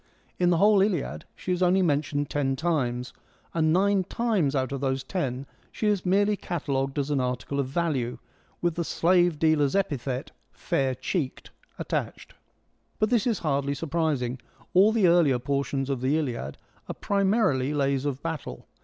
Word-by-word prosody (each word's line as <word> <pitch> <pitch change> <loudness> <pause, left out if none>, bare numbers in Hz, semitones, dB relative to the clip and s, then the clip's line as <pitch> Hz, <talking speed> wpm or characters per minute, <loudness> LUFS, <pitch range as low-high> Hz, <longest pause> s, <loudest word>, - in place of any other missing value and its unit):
In 175 -1 +3
the 175 - +3
whole 205 +2 +5
Iliad 190 -7 -1
she 185 - -4
is 180 0 -1
only 185 +1 +4
mentioned 145 -2 0
ten 135 -2 0
times, 130 -6 -1 0.4
and 160 -1 +2
nine 195 +2 +3
times 200 - 0
out 130 -1 0
of 140 -1 -4
those 135 -1 -1
ten 135 -5 -3 0.3
she - - -4
is 205 -3 +1
merely 205 +3 +3
cata 170 -7 -4
logued 135 +1 -1
as 145 +1 -1
an 140 - +1
article 125 +2 -2
of 135 - 0
value, 135 -5 -1 0.5
with 175 -1 +2
the 170 +1 -2
slave 175 0 +2
dealer's 155 -2 +2
epithet, 135 -9 -2 0.2
' - - -44 0.2
fair 130 -1 +1
cheeked,' 130 +2 -3 0.3
attached. - - -4 0.6
But 215 +1 +1
this 235 -1 +2
is 230 - +1
hardly 140 -1 0
surprising. 145 -5 -1 0.3
All 195 +4 +6
the 220 -5 +3
earlier 170 -7 +4
portions 140 +1 -2
of 135 -3 -2
the 135 +4 +2
Iliad 120 - -3 0.3
are - - -4
primarily 195 - +1
lays 140 -2 0
of 145 -2 -3
battle. 155 - -5
150 Hz, 170 wpm, -26 LUFS, 135-180 Hz, 0.6 s, All